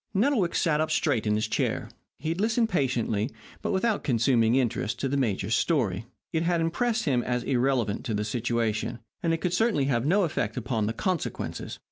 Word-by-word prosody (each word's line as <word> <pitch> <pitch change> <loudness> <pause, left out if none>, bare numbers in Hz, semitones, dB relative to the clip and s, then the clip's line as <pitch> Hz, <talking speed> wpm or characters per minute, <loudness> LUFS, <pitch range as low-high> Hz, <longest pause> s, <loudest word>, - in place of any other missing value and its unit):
Nettlewick 210 -5 +2
sat 155 -2 +2
up 155 - 0
straight 125 -9 +1
in 105 - +3
his 110 +1 0
chair. - - -1 0.3
He 155 - -4
had 170 +4 -1
listened 225 +1 +2
patiently, 125 - 0 0.3
but - - -1
without 205 +2 +1
consuming 120 -2 +3
interest, 120 -4 0
to 135 - +1
the 135 - -1
major's 110 -5 0
story. 115 - +1 0.3
It 160 - +1
had 170 0 +1
impressed 225 +8 0
him 130 -5 +2
as 125 0 -1
irrelevant 125 -5 +1
to 115 -5 -1
the 105 +1 -1
situation, 115 0 -1 0.2
and 170 -3 +1
it 165 - 0
could 180 -1 0
certainly 205 -8 +2
have 130 -1 +1
no 195 +5 +4
effect 115 - -1
upon 115 -3 -1
the 110 - -1
consequences. 180 - -3
135 Hz, 190 wpm, -27 LUFS, 115-170 Hz, 0.3 s, no